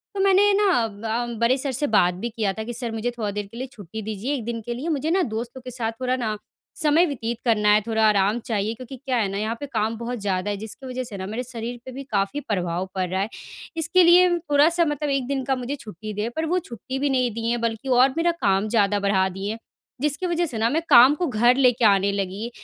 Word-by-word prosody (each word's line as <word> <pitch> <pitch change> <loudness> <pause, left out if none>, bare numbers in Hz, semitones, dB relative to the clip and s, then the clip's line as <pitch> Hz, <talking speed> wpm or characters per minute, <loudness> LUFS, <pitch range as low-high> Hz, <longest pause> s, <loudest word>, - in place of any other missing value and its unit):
तो - - -3
मैंने 395 +1 +5
ना 400 -1 +3
अ, 225 +2 -3
बड़े 240 +3 +3
सर 270 0 -2
से 280 +4 -1
बात 180 -5 +3
भी 190 +7 -4
किया 215 -4 -1
था 220 - -5
कि 240 +2 -6
सर 240 -1 -3
मुझे 225 +2 -2
थोड़ा 210 -3 -2
देर 205 0 -4
के 230 - -10
लिए 260 +2 -4
छुट्टी 215 -2 -8
दीजिए 220 +5 -3
1 250 - -4
दिन 235 -1 -3
के 240 - -3
लिए 280 +8 -4
मुझे 310 +1 -1
ना 375 +2 +3
दोस्तों 240 +3 -5
के 250 0 -8
साथ 230 -2 -2
थोड़ा 255 0 +1
ना 220 -4 -2 0.4
समय 315 +3 +4
व्यतीत 240 -7 -3
करना 210 -3 +3
है, 210 - +4
थोड़ा 220 -1 +1
आराम 205 +2 +2
चाहिए। 215 0 -1
क्योंकि 255 +2 -9
क्या 255 -1 -2
है 215 - +1
ना 200 - -3
यहाँ 220 +2 -2
पे 285 - -4
काम 220 +1 0
बहुत 240 +1 -4
ज़्यादा 195 0 -1
है 205 - -3
जिसकी 220 +6 -8
वज़ह 255 0 -4
से 215 -5 -8
ना 190 - -5
मेरे 220 +5 -4
शरीर 240 -1 -6
पे 260 - -7
भी 270 +2 -7
काफ़ी 200 +6 0
प्रभाव 180 -6 -2
पड़ 185 -1 0
रहा 190 +1 -1
है। 200 - -2 0.5
इसके 340 +3 +4
लिए 355 +1 +7
थोड़ा-सा 325 +2 +3
मतलब 295 -1 -2
1 275 -3 0
दिन 275 -1 -1
का 265 - +1
मुझे 255 +2 -4
छुट्टी 215 - -8
दें 210 +3 -2
पर 320 0 -1
वो 360 +3 +1
छुट्टी 260 - -7
भी 285 +1 +1
नहीं 255 -3 +1
दिए 230 +1 -2
हैं 240 0 -1
बल्कि 230 +2 -2
और 255 +1 +5
मेरा 340 +1 +3
काम 195 +1 +2
ज़्यादा 205 -2 +2
बढ़ा 200 -1 +2
दिए। 195 +4 -4 0.4
जिसकी 300 +4 0
वज़ह 345 0 0
से 245 -8 -5
ना 225 +1 +2
मैं 315 +6 0
काम 260 +1 +8
को 355 - -1
घर 240 0 +3
लेके 250 -3 +3
आने 200 -1 +4
लगी 200 +3 -3
235 Hz, 255 wpm, -23 LUFS, 210-275 Hz, 0.5 s, काम